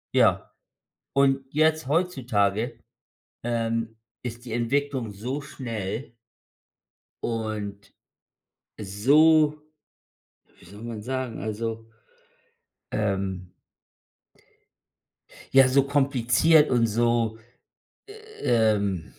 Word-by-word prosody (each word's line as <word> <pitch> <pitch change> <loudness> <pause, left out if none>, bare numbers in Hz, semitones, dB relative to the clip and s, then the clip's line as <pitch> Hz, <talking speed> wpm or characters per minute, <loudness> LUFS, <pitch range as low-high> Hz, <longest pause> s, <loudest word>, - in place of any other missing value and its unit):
Ja, - - +3 0.6
und 135 0 +3
jetzt 155 -1 +2
heutzutage, 120 - 0 0.7
ähm, 115 -1 -2 0.2
ist 120 0 -7
die 115 - -6
Entwicklung 130 +1 -1
so 120 +8 -5
schnell 115 -3 -6 1.1
Und 105 -3 -4 0.9
so 150 +9 +4 1.0
wie - - -18
soll 100 +5 -12
man 115 -2 -6
sagen, 130 -1 -3
also, 115 +1 -4 1.0
ähm 95 -3 -2 2.0
ja, 135 -1 +7
so 135 +1 +4
kompliziert 140 +2 +3
und 120 -2 +3
so, 115 0 +1 1.0
ähm 105 -6 +2
115 Hz, 75 wpm, -25 LUFS, 110-135 Hz, 2.0 s, ja